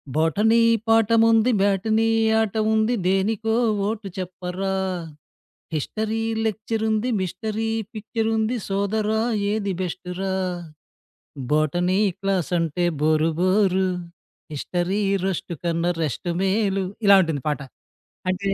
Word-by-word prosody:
Botany 210 +9 +3 0.3
పాఠముంది, 225 +1 +4
matinee 215 +3 +2 0.3
ఆట 220 -1 -2 0.2
ఉంది, 220 +3 +2
దేనికో 220 +4 +1 0.3
ఓటు 215 -2 -3
చెప్పరా? 185 +1 -4 1.0
హిస్టరీ 220 +8 -2 0.2
లెక్చరుంది, 220 +2 -1
మిస్టరీ 215 +5 -3 0.2
పిక్చరుంది, 220 +2 -1
సోదరా, 210 +2 0 0.3
ఏది 205 -2 -1
బెస్టురా? 185 +1 -4 1.2
Botany 175 +5 +2 0.2
క్లాసంటే 175 -3 0 0.2
bore 155 +1 +3
bore. 190 0 +3 0.7
హిస్టరీ 180 +7 -1 0.2
రోష్టు 185 -2 -2
కన్నా 170 0 0
రెష్టు 155 +4 -3
మేలు 195 0 +1 0.2
ఇలా 200 0 +8
ఉంటుంది 160 -5 -2
పాట. 150 0 0 0.7
అంటే, 185 +2 -1
195 Hz, 90 wpm, -23 LUFS, 180-220 Hz, 1.2 s, ఇలా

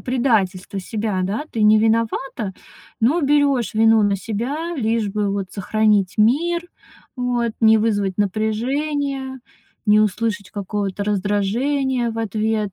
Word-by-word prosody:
предательство 205 -7 0
себя, 210 0 -2
да? 205 +10 -2
Ты 220 - -1
не 215 0 +6
виновата, 225 -1 0 0.5
но 275 +10 +3
берёшь 280 -5 +2
вину 225 0 +5
на 200 -1 +2
себя, 265 - -4
лишь 225 -3 0
бы 205 0 -1
вот 195 -2 -3
сохранить 205 -1 +1
мир. 340 +10 +2 0.5
Вот. 245 -2 -1
Не 220 -1 +6
вызвать 205 -3 0
напряжение, 265 +7 -1 0.5
не 210 0 +5
услышать 210 -1 -1
какого-то 200 0 -3
раздражения 230 +6 0
в 225 - -6
ответ. 215 -1 -1
220 Hz, 125 wpm, -20 LUFS, 205-250 Hz, 0.5 s, не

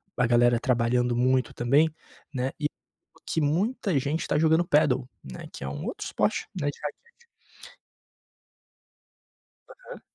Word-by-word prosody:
a 125 - +2
galera 120 0 +4
trabalhando 125 -1 +1
muito 130 +1 +2
também, 145 +6 +3 0.4
né. 130 0 -1
E, 150 - +1 0.5
o - - -21
que 160 - -1
muita 185 - 0
gente 145 +4 -1
está - - 0
jogando 160 +2 +3
Padel, 140 -5 +3 0.2
né? 65 -2 -9
Que - - -9
é 70 - -4
um 70 +1 -6
outro - - -5
esporte, - - 0
né, 145 - +1
de 145 - -8
raquete. 470 - -9 2.4
Aham. - - -12
140 Hz, 140 wpm, -27 LUFS, 125-160 Hz, 2.4 s, galera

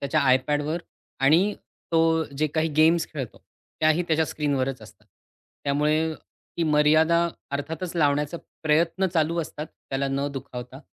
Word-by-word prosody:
त्याच्या 150 +2 +1
आयपॅडवर 145 +5 +1 0.4
आणि 180 +9 +4 0.4
तो 165 0 +3
जे 155 - +2
काही 160 +2 0
गेम्स 160 +1 +4
खेळतो 135 -6 -6 0.4
त्याही 155 +3 +3
त्याच्या 160 0 +3
स्क्रीनवरच 135 -3 -1
असतात. - - -16 0.6
त्यामुळे 150 +3 +1
ती 170 - -9
मर्यादा 160 +3 +4 0.2
अर्थातच 160 +5 -4
लावण्याचा 150 +1 +1 0.3
प्रयत्न 165 +5 +2
चालू 165 +1 +2
असतात 155 0 -6
त्याला 135 -1 -4
न 140 +1 -1
दुखावता 130 0 -8
155 Hz, 125 wpm, -25 LUFS, 140-160 Hz, 0.6 s, आणि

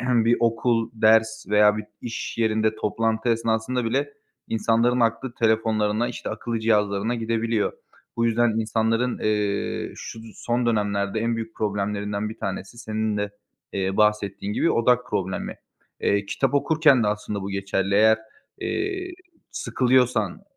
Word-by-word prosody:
bir 120 -2 +3
okul, 115 0 +1
ders 110 0 +3
veya 105 0 +5
bir 110 - -4 0.2
işyerinde 110 -2 -1
toplantı 110 +2 -1
esnasında 115 +2 0
bile 140 +5 -1 0.4
insanların 115 +2 +2
aklı 115 +2 0
telefonlarına, 110 0 +1
işte, 120 - -5
akıllı 115 -1 -3
cihazlarına 105 0 +1
gidebiliyor. 115 -1 0 0.4
Bu 115 - +2
yüzden 120 +1 +3
insanların, 115 +2 0
eee, 105 -1 -1
şu 110 - -8
d - - -12
son 120 0 -1
dönemlerde 105 -1 0
en 115 0 0
büyük 115 0 -6
problemlerinden 105 0 -2
bir 110 - -9
tanesi, 95 +4 -5
senin 110 -2 -2
de, 105 0 -2 0.4
eee, 95 0 -1
bahsettiğin 105 -1 +1
gibi, - - +2
odak 125 +1 +2
problemi. 95 -2 -3 0.4
Eee, 100 0 +1
kitap 135 +6 0
okurken 150 -3 +4
de 105 - +1
aslında 105 -1 -2
bu 100 - -4
geçerli. 100 0 -1
Eğer, 110 +1 +5 0.4
eee, 380 -1 -2 0.4
sıkılıyorsan, 125 -6 +1
110 Hz, 135 wpm, -24 LUFS, 105-115 Hz, 0.4 s, veya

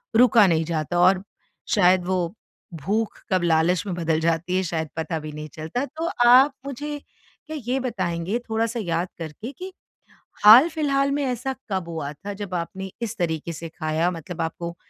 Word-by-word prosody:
रुका 230 -3 +6
नहीं 165 -2 +2
जाता 165 +1 -1
और 185 +1 +4 0.5
शायद 180 -2 +4
वो 180 -1 -1 0.5
भूख 220 +2 -1
कब 185 -2 +2
लालच 165 +1 +2
में 190 - -3
बदल 165 -2 0
जाती 170 +2 0
है 190 - +1
शायद 160 -3 -3
पता 160 0 -2
भी 155 0 -7
नहीं 150 +1 -7
चलता। 165 - -3
तो 320 +5 -4 0.2
आप 260 +4 +7
मुझे 290 +2 -5
क्या 310 +2 -12
ये 260 +2 +1
बताएँगे, 190 -3 -2
थोड़ा-सा 230 +1 -1
याद 175 -2 -1
करके 165 - -6
कि, 370 +7 -8 0.7
हाल-फिलहाल 275 +3 +6
में 285 0 0
ऐसा 255 +1 -2 0.2
कब 185 -3 -2
हुआ 155 -3 -4
था 200 +7 -7
जब 200 -2 -7
आपने 190 +3 -5
इस 225 -1 -4
तरीके 165 -1 -2
से 165 +1 -7
खाया? 160 +2 -1
मतलब 170 0 -6
आपको 170 +1 -4
185 Hz, 170 wpm, -24 LUFS, 165-240 Hz, 0.7 s, आप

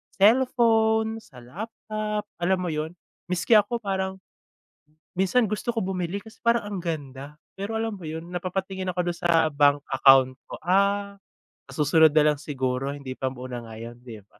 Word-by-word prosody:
cellphone, 220 0 +3
sa 125 - -15
laptop, 210 - -5 0.2
alam 185 +2 +2
mo 175 -3 -2
yon? 155 +2 -4 0.3
Miski 180 +3 -2
ako, 220 +3 -2
parang 190 -1 -2 1.0
minsan 195 +6 +2
gusto 215 +3 -3
ko 230 -1 0
bumili 185 0 -2
kasi 220 +2 -13
parang 235 -1 +2
ang 205 -2 -4
ganda. 145 -3 -6 0.2
Pero 200 +3 -4
alam 225 0 -2
mo 190 -4 -9
'yon, 160 +1 -6
napapatingin 185 +1 -3
ako 180 -1 -1
dun 170 - -9
sa 165 -3 +3
bank 145 0 +3
account 135 -1 +5 0.2
ko, - - -6
"Ah, 200 +2 +1 0.4
sa - - -13
susunod 155 0 +4
na 155 - +5
lang - - -8
siguro, 135 -2 -2
hindi 135 -2 -7
pa 130 -1 -2
muna 125 -2 -7
ngayon." 115 +1 -9
di 115 -4 -10
ba? - - -30
180 Hz, 165 wpm, -25 LUFS, 145-205 Hz, 1.0 s, account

